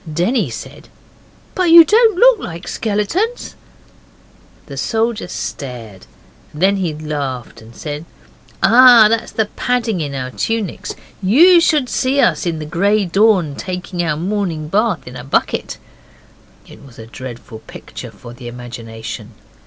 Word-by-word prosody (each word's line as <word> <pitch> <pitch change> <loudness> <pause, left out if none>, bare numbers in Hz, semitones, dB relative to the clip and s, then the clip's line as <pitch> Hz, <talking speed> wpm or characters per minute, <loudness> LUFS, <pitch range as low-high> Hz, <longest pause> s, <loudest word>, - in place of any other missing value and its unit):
Denny 180 - 0
said, 115 - -9 0.7
'But 365 -3 +1
you 335 0 +10
don't 440 -1 +4
look - - +5
like 170 - -8
skeletons.' 235 - -2 1.1
The 140 - -9
soldier 225 - -1
stared, 115 - -7 0.4
then 190 +6 +1
he 180 -4 -1
laughed 140 -7 -5
and 115 +1 -15
said, 150 +1 -6 0.6
'Ah, 235 +2 +8
that's 230 0 -1
the 220 - 0
padding 235 -7 -1
in 140 -2 -4
our 130 -1 -4
tunics. 225 - -3 0.3
You 325 - +6
should 300 -5 +2
see 260 +3 0
us 205 - +2
in 165 -2 -2
the 155 - -6
grey 200 +6 +1
dawn 190 -4 +2
taking 180 0 -5
our 155 -3 -1
morning 175 -4 -3
bath 210 - 0
in 125 - -9
a 125 - -8
bucket.' 135 - -1 0.9
It - - -15
was 135 -4 -16
a 110 - -10
dreadful 120 -2 -9
picture - - -10
for 120 -1 -13
the 120 0 -10
imagination. 115 -2 -8
180 Hz, 140 wpm, -17 LUFS, -, 1.1 s, you